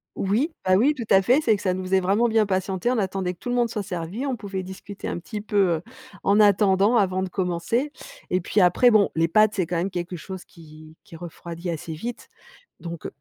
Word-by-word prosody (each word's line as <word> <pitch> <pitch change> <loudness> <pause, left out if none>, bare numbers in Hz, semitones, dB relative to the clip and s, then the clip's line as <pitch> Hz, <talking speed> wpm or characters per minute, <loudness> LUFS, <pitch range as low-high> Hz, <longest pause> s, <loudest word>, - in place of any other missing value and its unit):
Oui, 235 - 0
bah 185 - +4
oui, 265 +10 +4
tout 235 -5 -6
à 195 0 +6
fait. 250 +8 +4
C'est 225 -7 +3
que, 200 - -7
ça 185 - 0
nous 185 0 -4
faisait 190 +1 +2
vraiment 200 +6 +2
bien 220 -1 +3
patienter. 190 +3 -1
On 255 - 0
attendait 190 -3 -1
que - - -23
tout 245 - -6
le 245 - 0
monde 240 -1 +2
soit 215 -2 -3
servi, 185 +6 -4
on 270 -2 -1
pouvait 195 -4 -5
discuter 190 +2 -8
un - - -3
petit 170 +6 -6
peu, 200 -5 +1
heu, - - -8 0.4
en 200 +2 +3
attendant 205 +2 +4
avant 190 -3 +1
de 190 - -4
commencer. 185 +10 -1 0.4
Et 185 - +1
puis 200 +4 0
après, 185 +7 +5
bon, 215 -3 +4
les 165 0 +2
pâtes, 215 +4 +4
c'est 185 -4 0
quand 175 +1 -2
même 180 +3 -1
quelque 175 -1 -5
chose 190 +3 -8
qui 155 -2 -15
qui 165 - -13
refroidit 170 +1 -7
assez 165 -1 -4
vite. 235 +10 -7 0.5
Donc 170 -1 -6
190 Hz, 230 wpm, -24 LUFS, 175-215 Hz, 0.5 s, à